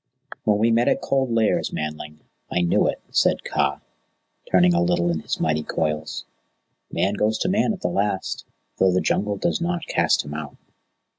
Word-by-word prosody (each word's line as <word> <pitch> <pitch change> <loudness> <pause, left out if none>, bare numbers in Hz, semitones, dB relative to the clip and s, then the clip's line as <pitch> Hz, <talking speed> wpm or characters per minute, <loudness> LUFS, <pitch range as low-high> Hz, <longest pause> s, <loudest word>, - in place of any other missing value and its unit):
"When 105 -1 +3
we 115 +2 +3
met 115 +1 +3
at - - +3
Cold 135 -2 0
Lairs, 115 -1 +1
Manling, 75 0 -5 0.3
I 90 - +1
knew 85 - +3
it," - - -2
said - - +2
Kaa, 70 0 0 0.7
turning 90 -1 +5
a 85 - +2
little 85 0 +2
in 80 - -1
his - - -4
mighty 80 -1 +1
coils. 75 0 -3 0.7
"Man 100 +2 +1
goes 105 +1 +1
to 180 - -1
Man 210 +4 +2
at 195 -4 -5
the - - 0
last, 100 -1 -1 0.4
though 95 -1 +5
the 90 - +2
Jungle 100 +1 0
does 170 - -1
not 175 0 -1
cast - - +1
him 75 - -7
out." 75 -2 -6
95 Hz, 180 wpm, -23 LUFS, 80-115 Hz, 0.7 s, turning